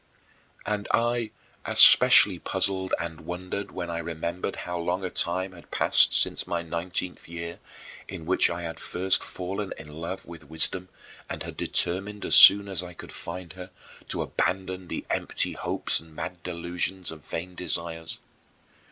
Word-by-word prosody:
And 105 -1 -2
I 120 -1 +1 0.3
especially - - +8
puzzled 95 -1 -1
and 80 -2 -5
wondered 90 +4 -5
when 85 -1 -5
I 85 - -3
remembered 85 +3 -4
how 90 0 -4
long 90 +2 -2
a 90 - -4
time 95 +2 -1
had 85 -2 -15
passed - - +4
since - - 0
my 85 -1 -2
nineteenth 85 +2 -4
year, 85 0 -7 0.5
in 90 -4 -8
which 95 +3 +4
I 85 0 -4
had 80 -1 -6
first 95 +1 0
fallen 95 +2 -5
in 80 - -11
love 85 +5 -6
with 80 -4 -12
wisdom 90 +3 0 0.4
and - - -4
had - - -7
determined 100 +4 -1
as - - 0
soon 100 +1 +9
as 95 -3 -1
I 90 -1 -9
could - - -10
find 85 -1 -7
her 90 0 -9 0.4
to - - -2
abandon 95 -1 -2
the - - -5
empty - - -1
hopes - - -2
and 80 -1 -17
mad 90 +2 -6
delusions 90 +1 -3
of 80 -2 -11
vain 90 +2 -6
desires. 85 -2 -3
90 Hz, 160 wpm, -26 LUFS, 85-95 Hz, 0.5 s, soon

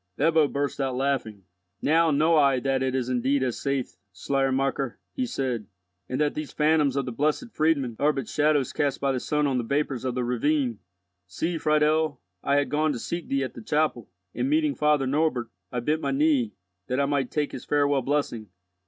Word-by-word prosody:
Ebbo 160 -2 +4
burst 140 0 -2
out 135 -2 -1
laughing. 130 -7 -1 0.4
"Now 165 +2 +3
know 155 +3 +3
I 140 -4 +4
that 135 0 0
it 130 0 0
is 130 -2 -1
indeed 130 +2 +1
as 125 -3 -2
saith 140 -2 -2
Schleiermacher," 135 +5 -1 0.2
he 255 -1 -2
said, 125 - -2 0.4
"and 130 - -2
that 150 -1 +2
these 155 -1 -5
phantoms 150 -3 +2
of 140 -2 0
the 125 - -4
Blessed 155 - -1
Friedmund 140 -7 +1
are 150 +1 +4
but 135 -3 -4
shadows 145 -3 +1
cast 140 -2 0
by 140 -1 +1
the 130 - -1
sun 150 +3 0
on 135 -3 +1
the - - -1
vapours 140 0 -1
of 130 -2 -2
the 125 - 0
ravine. 125 0 0 0.5
See, 160 - -2
Friedel, 155 -1 +2 0.2
I 140 - +2
had 145 0 +2
gone 155 0 +1
to - - -4
seek 170 +8 -4
thee 135 0 0
at 130 - -5
the - - -9
chapel, 150 - 0 0.2
and 265 - -1
meeting 305 -1 +2
Father 150 - +2
Norbert, 135 -4 0 0.2
I 125 - -2
bent 155 +6 0
my - - -1
knee, 275 -5 +2 0.3
that 125 +2 -1
I 140 - +3
might 140 -2 0
take 150 -1 -1
his - - -8
farewell 145 -1 +2
blessing. 120 -6 -2
140 Hz, 200 wpm, -26 LUFS, 130-155 Hz, 0.5 s, Ebbo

